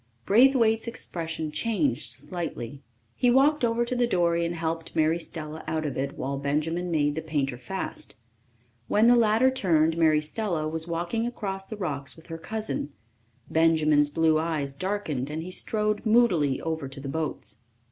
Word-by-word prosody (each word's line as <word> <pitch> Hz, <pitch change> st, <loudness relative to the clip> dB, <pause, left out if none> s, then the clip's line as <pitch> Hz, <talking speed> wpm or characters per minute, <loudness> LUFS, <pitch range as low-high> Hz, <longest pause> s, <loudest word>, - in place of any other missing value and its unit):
Braithwaite's 230 Hz, 0 st, +4 dB
expression 165 Hz, -8 st, -4 dB
changed 160 Hz, -, 0 dB
slightly. 145 Hz, -4 st, -6 dB, 0.3 s
He 245 Hz, -, +3 dB
walked 275 Hz, +3 st, +4 dB
over 235 Hz, 0 st, +2 dB
to 250 Hz, -, -2 dB
the 245 Hz, -1 st, +2 dB
dory 170 Hz, -5 st, +2 dB
and 170 Hz, -, -4 dB
helped 165 Hz, 0 st, -3 dB
Mary 160 Hz, +1 st, +2 dB
Stella 160 Hz, -2 st, -5 dB
out 155 Hz, -1 st, -1 dB
of 140 Hz, -4 st, -3 dB
it 140 Hz, +1 st, -3 dB
while 135 Hz, +1 st, -3 dB
Benjamin 155 Hz, +5 st, -1 dB
made 145 Hz, -3 st, +1 dB
the 160 Hz, -, -3 dB
painter 145 Hz, -5 st, -1 dB
fast. 190 Hz, +10 st, -6 dB, 0.7 s
When 215 Hz, +2 st, +3 dB
the 240 Hz, +1 st, +7 dB
latter 230 Hz, +2 st, +4 dB
turned, 165 Hz, -9 st, +2 dB
Mary 155 Hz, -2 st, +5 dB
Stella 160 Hz, 0 st, -2 dB
was 160 Hz, +1 st, -3 dB
walking 175 Hz, +8 st, -1 dB
across 195 Hz, -5 st, -5 dB
the 220 Hz, -, -7 dB
rocks 145 Hz, -8 st, -3 dB
with 165 Hz, -, -16 dB
her 165 Hz, 0 st, -6 dB
cousin. 215 Hz, -7 st, -3 dB, 0.5 s
Benjamin's 155 Hz, -2 st, +4 dB
blue 160 Hz, 0 st, +3 dB
eyes 155 Hz, -4 st, -2 dB
darkened, 160 Hz, -6 st, -2 dB
and 155 Hz, +2 st, -4 dB
he 180 Hz, -, -7 dB
strode 210 Hz, +2 st, -1 dB
moodily 215 Hz, -, +3 dB
over 160 Hz, -3 st, -3 dB
to 135 Hz, +1 st, -7 dB
the 135 Hz, -, -7 dB
boats. 135 Hz, -8 st, -4 dB
165 Hz, 165 wpm, -26 LUFS, 150-210 Hz, 0.7 s, the